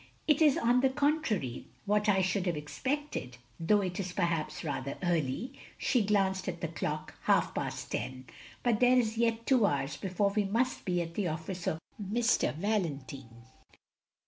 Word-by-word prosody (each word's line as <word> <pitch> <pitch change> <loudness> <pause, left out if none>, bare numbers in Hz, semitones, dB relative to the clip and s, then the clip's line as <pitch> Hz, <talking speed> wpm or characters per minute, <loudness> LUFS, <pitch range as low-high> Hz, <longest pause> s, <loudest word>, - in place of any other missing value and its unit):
It 300 0 +4
is 300 -4 +6
on 240 +2 +3
the 265 - +4
contrary 265 - 0 0.2
what 210 +1 +2
I 190 -2 +4
should 185 0 0
have 170 -3 0
expected, 260 - -3 0.2
though 205 +5 +3
it 180 -1 -3
is 185 -2 -3
perhaps 165 -3 -1
rather 140 -3 -3
early 175 - 0
— - - -17
" - - -27
she 250 - +2
glanced 195 -2 +1
at 175 -2 -3
the 170 - -2
clock, 155 -2 -4
"half - - +3
past - - -4
ten. 130 0 -4 0.4
But 235 -3 +2
there 250 0 +5
is 225 -2 +1
yet 230 0 +1
two 255 -4 +4
hours 140 -2 -1
before 200 +1 0
we 210 0 +1
must 235 +6 0
be 175 -2 +1
at 165 0 -8
the 195 0 -1
office 170 +3 -4
of 160 - +1 0.2
M. 210 +3 -2 0.4
Valentine. 140 - -3
190 Hz, 175 wpm, -31 LUFS, 160-230 Hz, 0.4 s, is